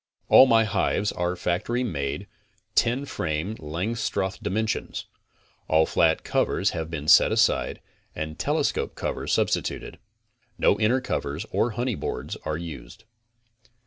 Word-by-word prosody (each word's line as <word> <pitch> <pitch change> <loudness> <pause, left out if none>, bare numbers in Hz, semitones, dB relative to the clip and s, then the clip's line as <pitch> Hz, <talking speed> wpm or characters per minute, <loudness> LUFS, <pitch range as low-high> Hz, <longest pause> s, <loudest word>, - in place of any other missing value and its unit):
All 135 - +9
my 115 -2 +5
hives 105 -1 0
are 90 +1 -2
factory 100 +8 -1
made, 70 - -3 0.5
ten 125 +4 +2
frame 85 - -2
Langstroth 95 +5 -2
dimensions. 110 +1 -2 0.6
All 80 0 +4
flat 80 0 +2
covers - - +1
have 80 -1 -4
been 75 -3 -5
set 85 - +7
aside - - +2 0.4
and 80 0 -5
telescope - - 0
covers - - -3
substituted. - - -1 0.6
No 100 - +3
inner 120 +4 +2
covers, 75 - -3
or 120 - +1
honey 125 +1 0
boards, - - -4
are 75 0 -1
used. 85 -4 -9
90 Hz, 125 wpm, -25 LUFS, 80-115 Hz, 0.6 s, All